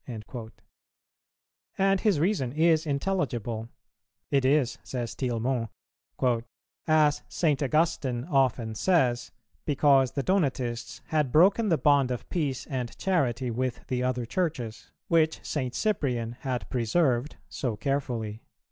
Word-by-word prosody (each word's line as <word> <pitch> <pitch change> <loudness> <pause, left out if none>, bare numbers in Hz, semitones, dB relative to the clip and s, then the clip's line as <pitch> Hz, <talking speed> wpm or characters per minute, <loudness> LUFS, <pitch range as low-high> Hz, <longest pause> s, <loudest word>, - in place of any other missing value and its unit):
"[364:1] 110 -1 -7 1.3
And 195 0 +3
his 205 -9 +2
reason 155 - 0
is 160 0 +3
intelligible: 130 - -2 0.6
it 140 -2 +3
is, 135 -2 +2
says 120 -3 -4
Tillemont, 120 -1 -1 1.2
"as 155 -2 +4
St. 150 -5 +1
Augustine 140 -4 +1
often 130 -7 +1
says, 125 -4 +2 0.3
because 140 -3 +3
the 140 - -1
Donatists 130 -10 -1
had 150 -5 +1
broken 200 - +5
the 165 - +3
bond 140 -4 +3
of 125 -1 -4
peace 145 -7 -1
and 125 -5 -4
charity 130 -10 0
with 125 +1 -3
the 125 -1 0
other 125 -1 -1
Churches, 125 -7 -3 0.2
which 160 -1 +2
St. 130 -4 -2
Cyprian 125 - 0
had 130 -2 -3
preserved 125 +2 +1
so 125 -5 -3
carefully." 115 -4 -2
135 Hz, 120 wpm, -27 LUFS, 120-155 Hz, 1.3 s, broken